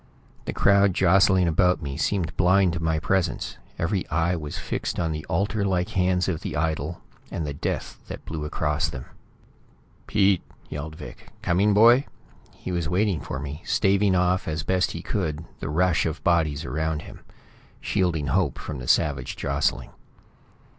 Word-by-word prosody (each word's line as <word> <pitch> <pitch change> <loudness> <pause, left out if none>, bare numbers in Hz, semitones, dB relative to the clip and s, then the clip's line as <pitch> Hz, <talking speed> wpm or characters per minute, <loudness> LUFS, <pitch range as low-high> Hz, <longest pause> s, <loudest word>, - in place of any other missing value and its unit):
The - - -2
crowd 100 -2 +4
jostling 95 0 +4
about 90 +1 +2
me 70 -1 -4
seemed 85 +2 -1
blind 90 0 +4
to 85 - -2
my 80 -1 +1
presence; 95 +3 -1 0.2
every 90 +2 -1
eye 80 +3 +1
was 75 -3 -5
fixed - - -3
on 80 -2 0
the 75 0 -4
altar 100 +4 0
like 90 -2 0
hands 90 -1 +1
of 85 -4 -2
the - - -4
idol, 80 +1 -2 0.3
and 80 - -3
the 75 - -3
death 70 - -4
that - - -8
blew 80 -2 -4
across 75 -1 -1
them. - - -7 1.0
"Pete!" 100 -3 +3 0.3
yelled 75 +1 -6
Vic. 75 - -11
"Coming, 100 +4 +3
boy?" 120 +5 +6 0.5
He - - -6
was 85 -2 -1
waiting 95 -3 +1
for - - -5
me, 75 +3 -6
staving 100 -1 +2
off 90 0 +1
as 75 -1 -2
best 95 +1 +1
he 85 - -6
could 80 -5 -2
the - - -4
rush 90 +2 +2
of 80 0 -5
bodies 80 -4 +1
around 80 +3 -2
him; - - -11 0.6
shielding 85 -7 0
Hope 80 -4 +1
from - - -6
the - - -7
savage 70 -4 +1
jostling. - - -1
85 Hz, 165 wpm, -25 LUFS, 75-95 Hz, 1.0 s, boy